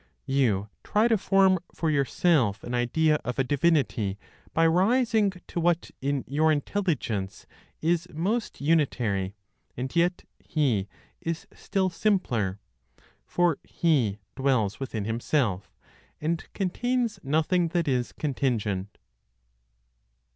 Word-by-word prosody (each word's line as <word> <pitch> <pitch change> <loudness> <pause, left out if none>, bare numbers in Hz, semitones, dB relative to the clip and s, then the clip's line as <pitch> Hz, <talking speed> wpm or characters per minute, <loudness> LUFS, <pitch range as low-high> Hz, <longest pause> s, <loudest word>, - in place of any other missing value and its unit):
You 125 -8 +1 0.2
try 215 +3 +3
to 225 - +5
form 190 -2 +4 0.2
for 160 -2 0
yourself 140 - +2
an 120 - -5
idea 150 +6 +2
of 125 +1 -3
a 135 - +3
divinity 135 - +1 0.3
by 165 - +3
rising 215 +4 +3
to - - -4
what 170 0 +1
in 140 0 0
your 155 +3 +2
intelligence 145 - -2 0.4
is 170 +1 +1
most 200 +9 -2
unitary 120 - +1 0.4
(and 130 +5 -4
yet 175 +1 +2 0.2
He 120 - 0 0.3
is 165 0 -3
still 190 -2 -1
simpler); 120 - 0 0.7
for 175 -4 +2
He 135 - +1 0.2
dwells 125 -7 +1
within 115 -6 -3
Himself, 115 -3 -1 0.5
and 160 +2 -2
contains 235 +5 -1
nothing 160 +5 +1
that 170 -1 -1
is 125 -3 0
contingent. 110 -9 -2
150 Hz, 110 wpm, -27 LUFS, 120-175 Hz, 0.7 s, to